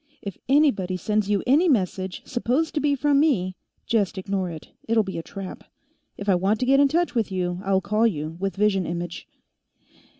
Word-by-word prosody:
If 200 -2 -5
anybody 240 -11 +3
sends 210 +2 0
you 205 -1 +1
any 305 +8 +4
message 190 - -1
supposed 260 +6 -1
to 305 - 0
be 290 -1 +2
from 285 +1 +2
me, 195 - +1 0.3
just 205 -4 0
ignore 190 -1 -2
it. 160 -2 -9 0.2
It'll 225 -1 +3
be 190 -4 -5
a - - -3
trap. 195 +2 -8 0.5
If 200 - -7
I 195 - +5
want 195 +4 +1
to - - +2
get 270 +2 +4
in 285 - +6
touch 340 +5 0
with 225 -5 0
you, 180 -1 -2
I'll 190 -1 +2
call 215 +4 +2
you, 155 -5 -3
with 195 0 -2
vision 195 -3 +1
image." 170 0 -5
200 Hz, 195 wpm, -24 LUFS, 185-255 Hz, 0.5 s, in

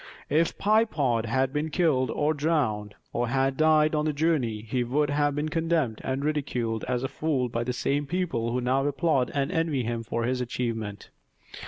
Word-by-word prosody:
If 160 +3 +2
Pye 215 +2 +4
Pod 125 - 0
had 130 +3 +1
been 150 +1 -1
killed 145 -7 +2
or 150 +5 +1
drowned, 140 -10 0 0.2
or 120 +1 0
had 135 +2 +1
died 155 +1 +4
on 150 0 +1
the 155 - 0
journey 140 -9 0
he 125 +3 -1
would 145 +4 0
have 145 0 +1
been 150 +1 -1
condemned 160 -7 0
and 135 +2 -2
ridiculed 125 -7 -1
as 125 0 -1
a - - 0
fool 135 -4 -1
by 115 0 -2
the 125 - -2
same 140 +3 -1
people 155 -9 -1
who 125 +1 -1
now 130 +2 +1
applaud 145 -2 +1
and 140 +2 0
envy 160 -7 0
him 115 0 -2
for 115 0 -3
his 125 +1 0
achievement. 115 -4 -4
135 Hz, 190 wpm, -27 LUFS, 120-155 Hz, 0.2 s, Pye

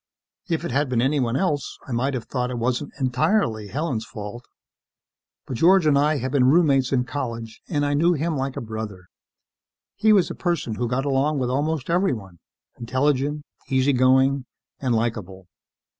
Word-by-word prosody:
If 165 -2 -1
it - - -3
had 140 +2 +1
been 125 -2 +1
anyone 130 -2 +1
else, 145 -3 -1
I - - -7
might 130 +3 0
have 120 - -3
thought 125 -2 -2
it 125 - -4
wasn't 125 +4 -1
entirely 125 - +1
Helen's 135 -2 -2
fault, 110 +3 -8 1.0
but 130 - -5
George 180 +4 +5
and 150 -2 +4
I 150 +2 +3
had 130 0 -3
been 135 -3 +3
roommates 140 -5 +3
in 130 -2 +2
college 115 -4 -5
and 145 -4 0
I 145 - 0
knew 165 +5 +3
him 160 +1 -1
like 135 0 -3
a - - -3
brother. 110 -5 -6 0.9
He 220 +2 +3
was 200 -4 +4
a - - -3
person 170 -10 -2
who 120 +3 -2
got 130 +3 -1
along 140 +2 +1
with 125 -2 -1
almost 145 +1 -1
everyone. 115 - -1 0.4
Intelligent, 140 +4 0 0.3
easy 135 +1 +2
going 130 +1 +3 0.3
and 125 -3 0
likeable. 105 -5 -3
130 Hz, 175 wpm, -23 LUFS, 120-145 Hz, 1.0 s, George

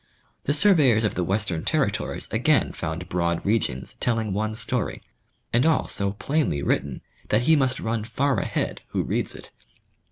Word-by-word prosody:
The 145 - +2
surveyors 145 - +5
of 105 - +1
the 90 - -1
western 95 -3 -1
territories - - -1
again - - +2
found 80 +3 -4
broad 85 -1 -1
regions 100 - 0
telling 115 -4 0
one 110 +2 -1
story, 115 -1 -2 0.5
and 120 +2 +4
all 160 0 +3
so 100 0 -1
plainly 135 - 0
written 70 -3 -1 0.3
that 105 - +3
he 160 +5 +5
must 130 -3 +1
run 115 -1 -2
far 135 +4 0
ahead - - -2
who - - -1
reads - - -1
it. - - -11
110 Hz, 160 wpm, -25 LUFS, 90-130 Hz, 0.5 s, surveyors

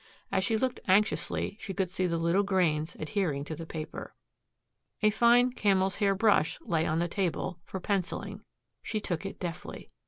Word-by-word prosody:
As 190 - +2
she 220 +3 +2
looked 255 +2 -1
anxiously 205 +1 +1
she 195 - -5
could 190 -3 -1
see 185 -1 0
the 170 -1 0
little 170 +4 +2
grains 175 -5 +1
adhering 155 -5 -1
to 155 - -5
the 165 +1 -8
paper. 155 -1 -6 0.9
A 215 - +6
fine 240 +3 +5
camel's 195 -4 +2
hair 200 -2 +2
brush 200 -6 +3
lay 160 -1 0
on 155 - +1
the 170 +1 +1
table, 180 -1 -2
for 190 - -5
penciling. 190 0 -2 0.4
She 215 - -2
took 190 -2 -3
it - - -9
deftly. 170 -3 -6
190 Hz, 175 wpm, -29 LUFS, 165-205 Hz, 0.9 s, A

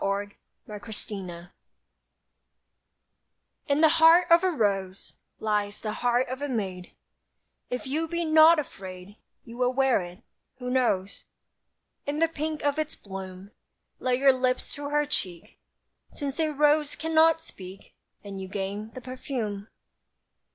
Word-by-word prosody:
WITH 200 +1 -1 0.4
A 210 -1 -7
ROSE 195 -5 -7 2.2
In 285 +1 +2
the 320 - +8
heart 330 +2 +6
of 335 +2 +7
a 375 - +3
rose 195 - -1 0.3
Lies 210 -1 -1
the 215 - -3
heart 245 +2 +1
of 260 +2 -5
a 290 - -2
maid; 190 -7 -4 0.7
If 250 - -4
you 310 +5 -1
be 340 +1 -2
not 315 +1 +7
afraid 195 -7 -7 0.3
You 230 +1 -10
will 250 0 +2
wear 265 -4 +3
it. 175 +1 -10 0.3
Who 250 -1 -4
knows? 200 -7 0 0.8
In 290 +1 -1
the 330 +1 +3
pink 310 -1 -4
of 290 +1 +1
its 310 -1 -2
bloom, 190 0 -9 0.5
Lay 255 -1 +1
your 270 +1 +5
lips 255 0 -1
to 285 0 -5
her 295 0 +2
cheek; 190 - -4 0.5
Since 285 0 -4
a 315 -1 +2
rose 295 0 +2
cannot 320 0 +3
speak, 190 - -12 0.3
And 195 -2 -7
you 190 - -6
gain 200 +2 -4
the 255 - -7
perfume. 240 -5 -5
250 Hz, 140 wpm, -27 LUFS, 200-295 Hz, 2.2 s, the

